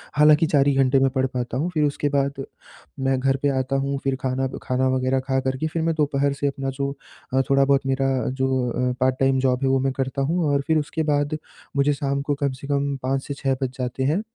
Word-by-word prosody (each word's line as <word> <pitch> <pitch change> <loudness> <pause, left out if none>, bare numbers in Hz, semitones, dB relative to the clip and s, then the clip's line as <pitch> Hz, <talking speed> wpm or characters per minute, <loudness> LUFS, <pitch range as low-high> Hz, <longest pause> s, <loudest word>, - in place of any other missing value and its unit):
हालाँकि 150 +1 +6
4 145 -2 +3
ही 140 - +4
घंटे 135 0 +3
में 135 0 +3
पढ़ 130 0 0
पाता 125 0 -3
हूँ 160 +6 0
फिर 155 - +1
उसके 145 0 -1
बाद 140 -1 -1 0.6
मैं 135 0 +1
घर 135 +1 +1
पे 145 - +2
आता 130 +1 -1
हूँ 140 0 -1
फिर 135 -1 0
खाना 130 0 -1 0.2
खाना 130 +1 0
वग़ैरह 130 +1 +1
खा 135 0 +1
कर 130 0 -2
के 155 - -1
फिर 165 +1 -3
मैं 165 -1 +1
दोपहर 140 -2 +1
से 145 - +2
अपना 135 -1 -3
जो 140 0 0 0.4
अ, 135 - +4
थोड़ा-बहुत 135 0 +3
मेरा 135 0 +1 0.2
जो 130 0 0
अ, 125 +1 0
पार्ट 130 0 +2
टाइम 135 -1 +3
जॉब 130 0 +1
है 135 - +2
वो 135 0 +3
मैं 135 0 0
करता 135 0 -2
हूँ 165 +6 0
और 140 - +2
फिर 160 - +3
उसके 155 +1 -2
बाद 145 +1 0 0.4
मुझे 140 +1 +3
शाम 140 -1 -2
को 145 0 -1
कम 140 - +2
से 140 - -7
कम 140 -1 0
5 135 +1 0
से 140 - -3
6 135 -1 -1
बज 130 - 0
जाते 125 +1 -2
हैं, 155 +9 +1
135 Hz, 245 wpm, -23 LUFS, 130-140 Hz, 0.6 s, हालाँकि